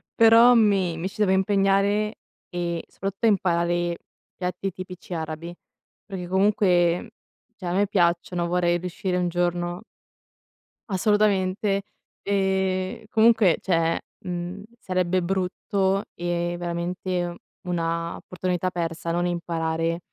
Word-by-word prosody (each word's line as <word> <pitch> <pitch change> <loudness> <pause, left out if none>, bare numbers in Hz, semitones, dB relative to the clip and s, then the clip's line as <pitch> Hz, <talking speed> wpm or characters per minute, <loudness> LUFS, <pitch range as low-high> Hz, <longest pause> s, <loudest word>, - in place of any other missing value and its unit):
però 230 +2 +7
mi 195 -7 +3
mi 170 +3 -2
ci 195 - -15
devo 195 - +4
impegnare 200 +2 +2 0.3
e 170 -1 -3
soprattutto 195 +4 -2
imparare 175 -3 +1 0.4
piatti 180 +2 -3
tipici 185 0 -8
arabi, 160 +1 -5 0.5
perché 185 -4 -6
comunque 180 -3 +2 0.5
cioè 180 -3 -5
a - - -1
me 200 +2 +2
piacciono, 175 -2 +1
vorrei 175 0 +2
riuscire 180 +1 -3
un 180 -1 +1
giorno 175 +2 -1 1.1
Assolutamente 200 0 +2 0.4
e 190 -1 0
comunque, 220 -5 +5
cioè, 165 -3 +1 0.3
mhmm, 180 +2 -4 0.2
sarebbe 185 -2 0
brutto 190 +2 0
e 175 0 -2
veramente 175 +1 -2 0.3
una 170 -2 -2
opportunità 185 0 -2
persa 170 -1 -3
non 175 +1 +1
imparare 165 -1 -1
180 Hz, 105 wpm, -25 LUFS, 175-195 Hz, 1.1 s, però